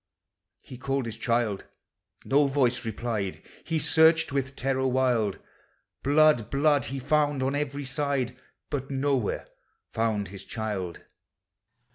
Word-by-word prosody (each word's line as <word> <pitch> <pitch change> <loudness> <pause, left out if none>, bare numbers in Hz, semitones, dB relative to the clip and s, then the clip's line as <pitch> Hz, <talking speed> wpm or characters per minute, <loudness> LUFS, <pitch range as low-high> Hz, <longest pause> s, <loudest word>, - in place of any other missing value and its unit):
He 125 - -11
called 135 0 -1
his 115 -1 -5
child, 115 -4 0 0.3
— - - -34
no 145 +1 +4
voice 130 -3 +1
replied, 110 -3 -3 0.2
— - - -24
He 165 - -1
searched 160 0 +4
with 135 -1 -2
terror 130 0 0
wild; 125 -6 +1 0.6
Blood, 145 -5 +4
blood 145 +1 +2
he 135 - -4
found 145 0 +1
on 135 +1 0
every 145 -1 -2
side, 130 -2 -1 0.4
But 135 -2 -3
nowhere 135 -4 0 0.5
found 110 -3 -1
his 100 0 -9
child. 105 -6 -4
130 Hz, 130 wpm, -27 LUFS, 115-145 Hz, 0.6 s, no